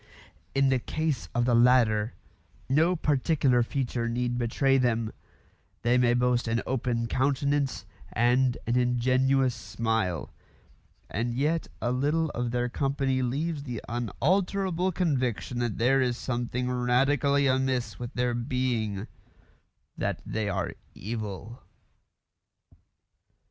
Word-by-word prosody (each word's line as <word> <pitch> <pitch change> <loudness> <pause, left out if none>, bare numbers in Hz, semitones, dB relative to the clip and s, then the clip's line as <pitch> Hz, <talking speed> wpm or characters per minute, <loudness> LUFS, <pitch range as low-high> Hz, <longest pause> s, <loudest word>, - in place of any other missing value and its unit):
In 135 0 +4
the 130 -1 +2
case 155 +3 -2
of 120 0 +2
the 125 - +2
latter, 115 -2 +4 0.5
no 160 +7 +3
particular 140 -4 +2
feature 120 -1 -2
need 120 +1 -1
betray 135 +3 +2
them; 115 -3 0 0.7
they 120 +1 +3
may 120 -1 +3
boast 125 -1 +1
an 115 +1 +1
open 120 -2 -1
countenance 140 +2 0 0.3
and 125 +1 +2
an 120 - 0
ingenuous 130 +2 +2
smile; 110 -7 -2 0.7
and 120 +4 -2
yet 155 +5 0 0.2
a 120 - +1
little 150 +5 +1
of 120 0 -2
their 120 +1 0
company 135 0 0
leaves 145 +5 -1
the 125 -5 -5
unalterable 180 - 0
conviction 130 - -1
that 120 -3 -1
there 130 +3 +3
is 125 -2 0
something 125 0 -2
radically 135 +3 +2
amiss 130 -4 0
with 120 0 -5
their 125 0 +1
being: 120 -4 -1 0.9
that - - -2
they 110 -2 -2
are 95 -2 -2 0.2
evil. 110 +2 -6
125 Hz, 115 wpm, -28 LUFS, 120-135 Hz, 0.9 s, In